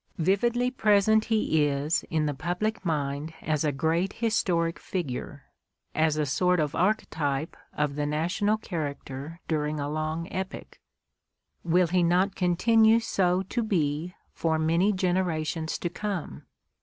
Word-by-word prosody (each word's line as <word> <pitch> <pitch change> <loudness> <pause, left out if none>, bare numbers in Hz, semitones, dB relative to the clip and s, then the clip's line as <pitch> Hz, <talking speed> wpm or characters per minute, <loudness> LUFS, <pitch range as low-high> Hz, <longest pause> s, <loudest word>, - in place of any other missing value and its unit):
Vividly 235 +8 +1
present 215 -2 +3
he 160 -9 +2
is 145 +4 0
in 155 -2 +1
the 145 - 0
public 180 +9 -2
mind 150 -1 -2
as 155 -1 0
a 150 - +2
great 165 +7 0
historic 170 -8 0
figure, 140 -5 -5 0.5
as 155 -1 +2
a 150 - +1
sort 180 +6 +2
of 150 -1 0
arch 210 +5 +1
type 145 0 -2 0.2
of 150 -1 -1
the 145 0 -2
national 175 +8 0
character 150 -4 -5
during 150 -1 -1
a 145 - -2
long 155 +2 -2
epoch. 190 0 -6 0.8
Will 175 +2 +3
he 180 +2 +1
not 180 +3 +2
continue 220 +5 +4
so 185 -4 +1
to 220 +5 -2
be 170 -5 -1 0.2
for 160 -1 0
many 165 +6 +2
generations 170 -5 -1
to - - -3
come 175 - -5
170 Hz, 140 wpm, -27 LUFS, 150-190 Hz, 0.8 s, continue